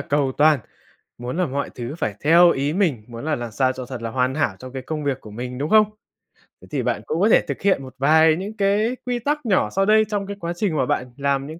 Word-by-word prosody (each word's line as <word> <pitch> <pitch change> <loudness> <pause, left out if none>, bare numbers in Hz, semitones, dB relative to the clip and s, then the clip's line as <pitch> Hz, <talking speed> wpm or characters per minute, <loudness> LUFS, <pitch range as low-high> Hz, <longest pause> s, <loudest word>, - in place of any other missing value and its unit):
cầu 140 -1 0
toàn, 150 -1 +5 0.6
muốn 125 +5 -5
là 180 - +2
mọi 140 +1 -3
thứ 125 +4 -6
phải 105 - -2
theo 170 +3 +6
ý 140 0 0
mình, 165 - 0
muốn 115 +3 -8
là 155 -1 0
làm 120 -1 -5
sao 130 +3 +1
cho 130 -1 -7
thật 125 -2 -7
là 115 - -3
hoàn 130 +2 0
hảo 150 - 0
trong 130 0 -10
cái 130 -1 -5
công 150 +1 -4
việc 135 -2 -1
của 105 - -12
mình, 125 +3 -6
đúng 145 +2 -3
không? 215 -1 +5 0.7
Thế - - -15
thì - - -1
bạn - - -1
cũng 460 - -2
có - - +4
thể - - +6
thực - - -4
hiện 190 -8 +2
một 130 0 -11
vài 155 +3 +5
những 205 +5 -6
cái 210 +5 +1
quy 245 -1 -1
tắc 295 +2 -2
nhỏ 195 -4 +2
sau 195 0 +1
đây 215 +1 +4
trong 200 -2 -2
cái 200 0 -6
quá 170 -1 -3
trình 175 -4 -1
mà - - +2
bạn 125 -1 -2
làm 140 0 0
những 160 +2 -9
150 Hz, 270 wpm, -22 LUFS, 130-195 Hz, 0.7 s, theo